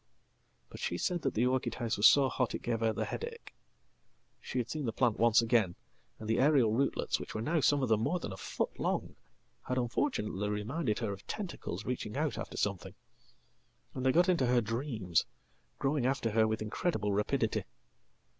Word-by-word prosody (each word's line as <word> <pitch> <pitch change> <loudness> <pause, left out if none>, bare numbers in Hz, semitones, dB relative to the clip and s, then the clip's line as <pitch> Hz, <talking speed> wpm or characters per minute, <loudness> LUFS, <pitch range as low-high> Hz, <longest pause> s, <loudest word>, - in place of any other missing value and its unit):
"But - - -10
she 85 - -2
said 175 - -1
that 135 - -1
the 115 +3 +3
orchid 130 0 0
house 115 -1 -1
was 105 - +7
so 140 -2 +6
hot 125 -2 -1
it - - -6
gave 115 -1 -1
her 115 0 +2
the - - -2
headache. 465 0 -6 0.9
She - - -6
had 120 -2 0
seen 145 +2 -3
the - - 0
plant 115 -1 +1
once 115 0 +5
again, 110 -6 +2 0.4
and 110 - -8
the 115 - +1
aerial 135 -5 +4
rootlets, 135 +4 0
which - - -8
were 110 - -2
nowsome 145 -1 +2
of 130 - 0
them 110 -1 +4
more 180 +10 0
than 105 - -5
a - - -8
foot - - -3
long, - - -1 0.5
had 125 - -1
unfortunately 115 - -1
reminded 105 +3 -1
her 110 -4 -2
oftentacles 175 - -6
reaching 125 -2 -3
out 150 -1 -1
after - - -6
something; 100 -3 -2 1.0
and 130 - -4
they 130 - +4
got 175 +5 +4
into 170 -9 +3
her 125 0 +4
dreams, 115 - -1 0.5
growing 135 -2 +1
after 130 -4 0
her 110 0 +3
with 110 0 -1
incredible 110 - -1
rapidity. 105 +1 0
120 Hz, 185 wpm, -32 LUFS, 110-140 Hz, 1.0 s, was